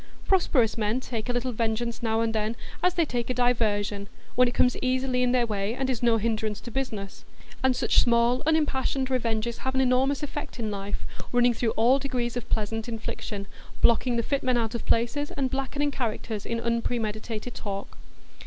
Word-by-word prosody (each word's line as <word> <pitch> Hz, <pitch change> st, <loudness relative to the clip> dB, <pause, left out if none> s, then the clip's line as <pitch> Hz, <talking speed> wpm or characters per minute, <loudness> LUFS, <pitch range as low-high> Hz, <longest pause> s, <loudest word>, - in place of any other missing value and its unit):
Prosperous 255 Hz, -, +3 dB
men 215 Hz, +3 st, +1 dB
take 240 Hz, -2 st, -4 dB
a -, -, +3 dB
little 245 Hz, +1 st, -1 dB
vengeance 230 Hz, +1 st, -1 dB
now 225 Hz, -1 st, +1 dB
and 225 Hz, -1 st, 0 dB
then, 220 Hz, +1 st, -1 dB, 0.3 s
as 360 Hz, 0 st, +2 dB
they 335 Hz, -, +3 dB
take 240 Hz, -4 st, -2 dB
a 255 Hz, -, 0 dB
diversion, 210 Hz, -4 st, +1 dB, 0.2 s
when 250 Hz, 0 st, +5 dB
it 240 Hz, -, -2 dB
comes 250 Hz, -, +4 dB
easily 255 Hz, 0 st, +1 dB
in 250 Hz, -1 st, +3 dB
their 250 Hz, -1 st, +3 dB
way, 210 Hz, 0 st, -2 dB
and 265 Hz, 0 st, 0 dB
is 240 Hz, -, -3 dB
no 235 Hz, -2 st, +4 dB
hindrance 220 Hz, -1 st, -1 dB
to 240 Hz, -, -8 dB
business; 215 Hz, -7 st, -4 dB, 0.4 s
and 260 Hz, -1 st, +4 dB
such -, -, +3 dB
small 235 Hz, +1 st, +3 dB
unimpassioned 275 Hz, -4 st, +1 dB
revenges 235 Hz, -2 st, 0 dB
have 260 Hz, 0 st, -3 dB
an 265 Hz, -, +4 dB
enormous 265 Hz, +3 st, +2 dB
effect 295 Hz, -1 st, -5 dB
in 220 Hz, -3 st, -2 dB
life, 200 Hz, 0 st, -4 dB, 0.3 s
running 245 Hz, 0 st, +4 dB
through 235 Hz, 0 st, 0 dB
all 245 Hz, +5 st, +5 dB
degrees 245 Hz, -4 st, -2 dB
of 240 Hz, -1 st, -5 dB
pleasant 225 Hz, +2 st, -1 dB
infliction, 220 Hz, -2 st, -4 dB, 0.4 s
blocking 240 Hz, +1 st, +4 dB
the 235 Hz, -, +1 dB
fit 280 Hz, +4 st, 0 dB
men 255 Hz, -1 st, +2 dB
out 225 Hz, 0 st, -1 dB
of 235 Hz, -, -4 dB
places, 260 Hz, +6 st, +1 dB
and 265 Hz, -2 st, 0 dB
blackening 280 Hz, +2 st, -1 dB
characters 225 Hz, -4 st, -3 dB
in 230 Hz, 0 st, -1 dB
unpremeditated 230 Hz, -1 st, -2 dB
talk. 200 Hz, -1 st, -6 dB
240 Hz, 190 wpm, -27 LUFS, 225-255 Hz, 0.4 s, when